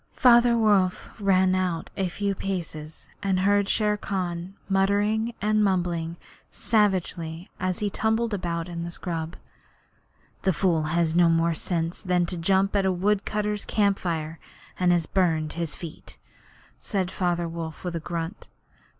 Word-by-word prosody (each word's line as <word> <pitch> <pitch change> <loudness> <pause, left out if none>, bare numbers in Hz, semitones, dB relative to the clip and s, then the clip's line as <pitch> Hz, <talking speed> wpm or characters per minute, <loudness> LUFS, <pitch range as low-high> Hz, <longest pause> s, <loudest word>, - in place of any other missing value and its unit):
Father 240 -1 +6
Wolf 200 -5 +2
ran 190 -1 +4
out 180 -3 -1
a 190 - 0
few 200 +3 -1
paces 165 -5 -5
and 190 -2 +1
heard 200 +1 +3
Shere 210 -1 +2
Khan 185 -2 -3
muttering 205 +4 +1
and 215 0 +3
mumbling 175 -3 0 0.3
savagely, 185 -5 0
as 185 +1 -2
he 205 - -1
tumbled 220 +2 0
about 170 -3 -2
in 170 -1 -5
the 170 - -4
scrub. 165 -2 -4 1.1
'The 190 - +2
fool 165 -1 +2
has 165 +1 +1
had 165 - 0
no 175 -1 +6
more 165 0 +3
sense 165 +1 -2
than 180 -2 +1
to 180 - -3
jump 190 +3 +2
at 200 - +3
a 190 - +2
woodcutters' 210 +2 0
camp 200 -2 +2
fire, 160 -2 -3 0.4
and 180 -1 +4
has 175 -2 +2
burned 160 -5 +1
his 170 -2 -3
feet,' 165 -3 -9 0.6
said 190 -4 -2
Father 175 -2 0
Wolf, 165 -1 -6
with 175 -2 -3
a - - -1
grunt. 170 +3 -5
185 Hz, 150 wpm, -26 LUFS, 170-200 Hz, 1.1 s, Father